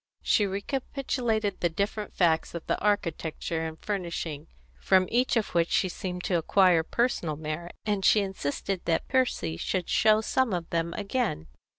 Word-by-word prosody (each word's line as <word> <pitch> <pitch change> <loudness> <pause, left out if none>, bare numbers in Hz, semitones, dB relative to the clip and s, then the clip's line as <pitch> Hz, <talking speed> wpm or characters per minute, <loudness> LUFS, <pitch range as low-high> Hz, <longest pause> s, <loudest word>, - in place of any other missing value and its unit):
She 205 - +3
recapitulated 225 0 -2
the 175 - +1
different 200 +5 -3
facts 165 -2 +2
of 170 - -6
the - - +1
architecture 165 -4 -1
and 160 0 -8
furnishing, 170 -7 -4 0.3
from 185 -1 +4
each 245 +1 +2
of 220 - 0
which 170 -1 +2
she 185 - +2
seemed 180 0 -5
to 180 -5 +1
acquire 180 0 +4
personal 170 -4 0
merit, 155 +3 -5
and 205 -3 0
she 210 - +5
insisted 190 0 -3
that 165 -1 0
Percy 255 - 0
should 180 - -2
show 215 0 +4
some 245 0 +1
of 170 -2 -2
them 170 0 -1
again. 205 - -2
185 Hz, 160 wpm, -28 LUFS, 165-215 Hz, 0.3 s, she